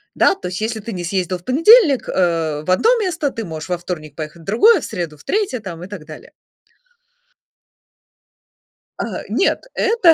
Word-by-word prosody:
Да, - - +4
то 180 - -7
есть, 180 - -5
если 220 0 -2
ты 230 - -6
не 180 -4 -5
съездил 185 0 -1
в 175 - -22
понедельник, 320 - +5
э, 165 -4 0
в 185 - 0
1 440 - +3
место, 335 -8 -1
ты 225 -2 -5
можешь 160 0 -7
во 180 - 0
вторник 160 -4 -7
поехать 155 +1 -7
в - - -16
другое, 390 - +5
в - - -5
среду 165 -4 -5
в - - -18
3 400 - -1
там 175 -4 -8
и - - -7
так 190 -7 -9
далее. 155 -1 -12 2.7
А, - - -4
нет, - - +1
это 440 -7 +4
185 Hz, 185 wpm, -19 LUFS, -, 2.7 s, понедельник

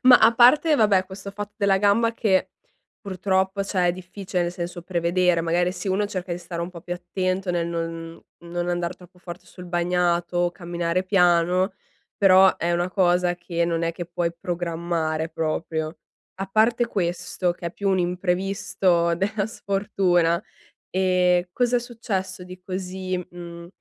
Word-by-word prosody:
Ma 250 -1 +8
a 225 +1 +5
parte 295 +7 +6
vabbè, 200 -5 +4
questo 195 +1 -8
fatto 205 +1 -7
della 200 -2 +3
gamba 220 +3 +3
che 190 -4 +1 0.5
purtroppo, 190 0 0
cioè 185 -3 0
è 175 - +2
difficile, 185 0 -4
nel 175 0 -2
senso, 175 0 -6
prevedere 175 0 +1
magari 175 +2 +1
se 195 - -5
uno 200 +2 +1
cerca 185 -3 -4
di 170 - -3
stare 170 -1 -5
un 170 - -5
po' 170 -2 -10
più 175 +1 -4
attento 185 +1 -2
nel 170 -1 0
non 165 -1 -5 0.2
non 175 +1 -3
andar 175 0 -1
troppo 180 0 -18
forte 175 0 -10
sul 180 - -12
bagnato 175 0 0
o 175 0 +2
camminare 175 0 -2
piano 180 0 +3 0.4
però 190 -1 +6
è 175 +1 0
una 175 +1 0
cosa 180 -2 +2
che 170 -1 -2
non 170 -1 -1
è 165 0 0
che 175 0 -6
puoi 170 -1 -2
programmare 170 -2 -2
proprio. 160 0 -3 0.4
A 195 0 -4
parte 225 +4 +2
questo 175 -1 -1
che 175 - -7
è - - -3
più 200 - -2
un 190 - +2
imprevisto 180 -1 +1
della 200 +3 -1
sfortuna, 195 -6 +1 0.5
ehm, 180 -1 +2
cos'è 245 0 +2
successo 195 -6 -4
di 185 0 -11
così, 185 0 -4 0.2
mhmm, 170 -1 -9
180 Hz, 160 wpm, -24 LUFS, 175-195 Hz, 0.5 s, Ma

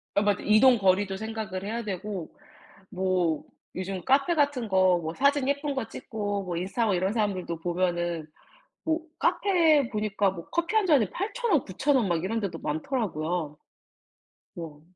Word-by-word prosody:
아 200 - +4
맞아. 205 -2 +1
이동 230 +4 +6
거리도 190 0 +2
생각을 215 -3 -5
해야 230 +3 -3
되고 195 -3 -5 0.6
뭐 180 -4 0 0.3
요즘 185 -1 -4
카페 275 +6 +3
같은 285 -7 +1
거 185 -2 +4
뭐 160 +1 -4
사진 280 0 +2
예쁜 285 0 -1
거 240 -4 -3
찍고 205 -3 -4
뭐 175 -2 -4
인스타 190 +7 -2
하고 210 -4 +2
이런 190 +3 0
사람들도 195 -6 -1
보면은 175 -2 -1 0.6
뭐 320 +1 +1 0.2
카페에 325 -9 +3
보니까 210 -2 0
뭐 170 -3 -9
커피 340 +6 -1
1 430 -3 +4
잔에 275 - +4
8,000 445 +4 -2
원 300 -7 +4
9,000 265 +9 0
원 230 -6 +2
막 170 -1 0
이런 225 +4 -1
데도 185 -6 -4
많더라고요. 160 - -2 1.0
뭐 155 -3 -8
205 Hz, 285 characters per minute, -27 LUFS, 180-265 Hz, 1.0 s, 이동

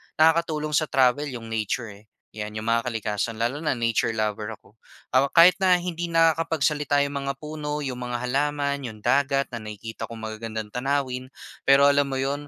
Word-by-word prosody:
nakakatulong 155 -1 +2
sa 155 +1 +2
travel 135 +2 +2
yung 115 -4 -7
nature, 110 +1 -2
eh, 105 +2 -16 0.2
'yan, 105 0 -6
yung 110 - -4
mga 115 +1 +1
kalikasan, 110 -1 -2
lalo 120 +6 -1
na 155 -4 0
nature 115 -1 0
lover 105 -1 -2
ako. 105 +2 -26 0.3
Ah, 130 +2 +4
kahit 170 +6 +6
na 185 -1 +5
hindi 175 -1 -3
nakakapagsalita 160 -3 +2
yung 140 0 -3
mga 140 0 -3
puno, 150 0 -5
yung 130 -3 -4
mga 120 -1 -4
halaman, 140 +2 0
yung 110 -2 -11
dagat, 140 -1 +2
na 120 - -5
nakikita 110 +1 -7
kong 115 -1 -9
magagandang 110 -1 -5
tanawin. 130 0 -2 0.4
Pero 135 +1 +6
alam 145 0 +2
mo 135 - -3
'yon, 140 +2 -2
135 Hz, 180 wpm, -25 LUFS, 115-150 Hz, 0.4 s, kahit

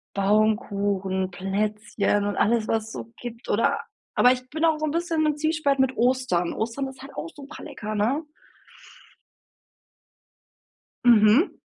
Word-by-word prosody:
Baumkuchen, 200 -2 +1
Plätzchen 205 +2 -1
und 205 - -2
alles, 225 0 +2
was 225 -1 +1
es 225 - -9
so 230 - -8
gibt 235 -1 -9
oder 230 - +2 0.3
aber 250 - +6
ich 255 0 -6
bin 315 +2 -2
auch 320 -2 +3
so - - -1
'n 310 - 0
bisschen 330 0 0
im 300 -1 +1
Zwiespalt 310 -2 +1
mit 265 -1 +2
Ostern. 240 -8 +1
Ostern 235 +5 -3
ist 265 - -12
halt 275 - -11
auch 330 - -5
super 290 +1 -10
lecker, 215 0 -6
ne? 240 +10 0 2.8
Mhm. 235 - +5
230 Hz, 145 wpm, -25 LUFS, 210-280 Hz, 2.8 s, aber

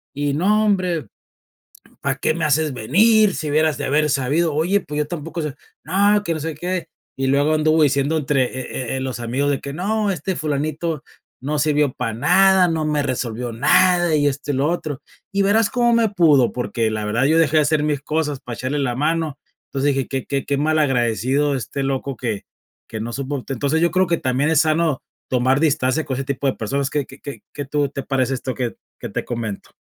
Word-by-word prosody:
y: 145 0 -1
"No, 210 +7 +2
hombre 180 - 0 1.0
¿para - - 0
qué 155 - +1
me 165 -2 -1
haces 150 -1 +2
venir, 205 - +4
si 155 -2 -3
hubieras 155 0 +2
de 145 - -2
haber 150 +2 +2
sabido?". 145 +5 +1
"Oye, 180 +7 +1
pues 150 +1 -5
yo 150 - 0
tampoco 165 0 -5
sé". 150 -2 -4 0.3
"No, 200 +5 +3
que 170 - -1
no - - -4
sé 160 +1 -3
qué" 175 0 -3 0.3
y 135 0 -1
luego 140 +3 +3
anduvo 155 0 +3
diciendo 140 +2 +2
entre, 140 -3 +1
eh 130 -1 -5
eh - - -2
eh - - -2
los 130 -2 -4
amigos 130 +5 -1
de 140 - -1
que 140 0 -6
no, 205 +5 -1
este 185 +1 -2
Fulanito 155 +1 -2 0.4
no 145 +3 -2
sirvió 150 -2 +2
para 115 -3 -3
nada, 190 - +4
no 160 -1 -1
me 150 -1 0
resolvió 125 -3 -3
nada, 175 +7 +3
y 145 -1 +3
esto 145 +1 -2
y - - -2
lo 140 +4 +1
otro. 155 -5 -3 0.3
Y 200 - +1
verás 205 +2 +3
cómo 240 -1 +2
me 230 -1 +4
pudo, 155 - +4
porque 120 -2 -1
la 110 -1 -3
verdad 115 +5 +1
yo 160 +3 +3
dejé 160 -1 +3
de 150 - +5
hacer 150 0 +1
mis 150 -2 0
cosas 150 -1 -2
para 120 -2 -7
echarle 130 +5 -2
la 125 -3 -1
mano. 155 0 -1 0.3
Entonces 140 +1 0
dije: 135 - -1
"Que 135 -2 -3
que 140 -1 -2
que 140 - 0
malagradecido 140 -2 +1
este 135 +2 -4
loco 135 0 -2
que 110 -5 -3 0.4
que 110 - -6
no 120 +2 -4
supo". 140 0 -3
Entonces, 140 +5 0
yo 170 - +3
creo 185 0 +2
que 170 - +2
también 130 +3 0
es 160 -1 +4
sano 155 -2 +1 0.3
tomar 130 +2 +2
distancia 145 -1 +1
con 130 - -3
ese 135 - -3
tipo 140 0 -2
de 130 - +2
personas. 135 +5 -2
¿Que 145 -2 -1
que 135 - -14
que 140 - -8
que 145 - -5
tú 145 0 0
te 140 - -5
parece 135 -1 0
esto 130 0 -4
que 125 -2 -3 0.2
que - - -6
te - - -4
comento? 115 -4 -5
145 Hz, 215 wpm, -21 LUFS, 135-160 Hz, 1.0 s, de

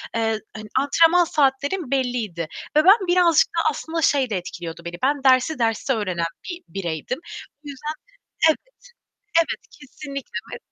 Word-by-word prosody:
eee, 225 -1 0 0.2
hani, 215 -1 -8
antrenman 330 +5 +4
saatlerim 285 +1 0
belliydi 235 - -1 0.3
ve 305 - +6
ben 390 -1 +6
birazcık 350 -3 +4
da 335 - -3
aslında 325 +3 -4
şey 275 -5 +2
de 200 - -1
etkiliyordu 170 -1 -7
beni: 170 0 -5
Ben 280 0 +1
dersi 260 +2 +4
derste 230 +3 +1
öğrenen 185 -6 -1 0.2
bir 350 0 -6
bireydim. 170 - -4 0.4
Bu 290 - -8
yüzden 300 +3 -5 0.6
Evet, 315 - +2 0.8
evet! 330 - -2
Kesinlikle 280 -1 -8 0.2
ve - - -7
270 Hz, 145 wpm, -23 LUFS, 215-315 Hz, 0.8 s, ve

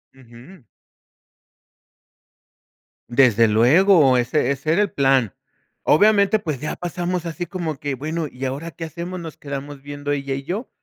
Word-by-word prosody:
Ujú. 130 +6 -16 2.5
Desde 120 -3 +4
luego, 135 - +5
ese 125 +4 +1
ese 155 +4 -1
era 205 - +3
el 205 - 0
plan. 135 -6 +2 0.5
Obviamente, 205 +4 +4
pues, 155 -10 -4
ya 150 - -3
pasamos 175 0 -3
así 170 +1 -4
como 165 -5 -4
que: 140 -2 -3
"Bueno, 155 +3 -3
¿y 130 +1 -7
ahora 145 +6 -4
qué 165 +3 -7
hacemos?". 175 +3 -6
Nos 160 -2 -8
quedamos 140 0 -7
viendo 145 0 -5
ella 140 -1 -2
y 135 - -6
yo. 195 - -4
150 Hz, 145 wpm, -21 LUFS, 135-175 Hz, 2.5 s, luego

